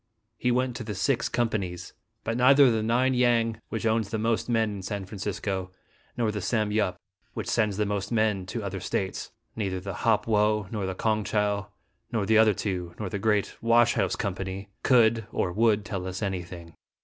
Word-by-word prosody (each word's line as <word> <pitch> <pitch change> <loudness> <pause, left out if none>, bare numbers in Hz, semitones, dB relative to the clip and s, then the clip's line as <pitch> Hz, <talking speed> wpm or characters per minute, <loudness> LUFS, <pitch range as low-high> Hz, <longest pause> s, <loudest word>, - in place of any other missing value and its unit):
He 125 - +1
went 125 0 +1
to - - -5
the 105 -2 -5
Six 115 +5 +1
Companies; 95 -7 -2 0.3
but 115 - -2
neither 130 +2 +6
the 110 -1 +1
Ning 125 +4 +2
Yang, 115 -2 +2
which 115 0 -3
owns 110 -2 +1
the 110 - -2
most 115 +2 0
men 115 -2 +2
in - - -7
San 100 0 -4
Francisco, 95 -1 -3 0.5
nor 115 -3 +1
the 105 -1 -4
Sam 110 0 0
Yup, 100 -4 0 0.4
which - - -4
sends 105 -2 +1
the 105 - +1
most 100 0 -2
men 110 -5 +1
to 115 +3 -4
other 100 -1 -4
States; 95 0 -3 0.2
neither 95 -4 -2
the 100 +1 -6
Hop 110 -2 +2
Wo, 105 -2 +2
nor 105 -4 -2
the 95 - -3
Kong 110 +1 0
Chow, 100 -1 0 0.4
nor 110 -4 0
the 110 +2 +4
other 110 -2 +5
two, 90 -4 -3
nor 105 -3 -4
the 100 - -3
great 105 -1 +1
washhouse 120 +1 +3
company, 95 0 -4
could 115 -3 +4
or 90 - -1
would 110 -1 +2
tell 95 -4 -4
us 95 +3 -4
anything. 90 -3 -5
105 Hz, 190 wpm, -27 LUFS, 95-115 Hz, 0.5 s, neither